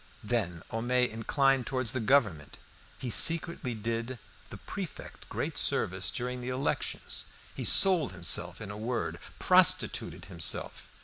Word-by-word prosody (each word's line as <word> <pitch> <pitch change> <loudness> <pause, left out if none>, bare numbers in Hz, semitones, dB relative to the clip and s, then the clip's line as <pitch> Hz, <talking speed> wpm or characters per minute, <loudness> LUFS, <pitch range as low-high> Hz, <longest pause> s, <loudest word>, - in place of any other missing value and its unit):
Then 105 -7 -2
Homais 125 +2 +1
inclined 135 +3 +1
towards 130 -4 0
the 130 - -1
Government. 105 - +1 0.4
He 125 - -5
secretly 165 -4 +5
did 115 +3 -4 0.3
the - - -9
prefect - - -9
great - - -3
service 95 0 0
during 125 +2 -4
the 125 - -5
elections. 130 +2 -3 0.3
He - - -6
sold 180 -7 +4
himself 85 -2 0
in 105 -1 -7
a 105 - -8
word, 120 +3 -4 0.2
prostituted - - +2
himself. 85 -3 -2
120 Hz, 130 wpm, -29 LUFS, 105-130 Hz, 0.4 s, secretly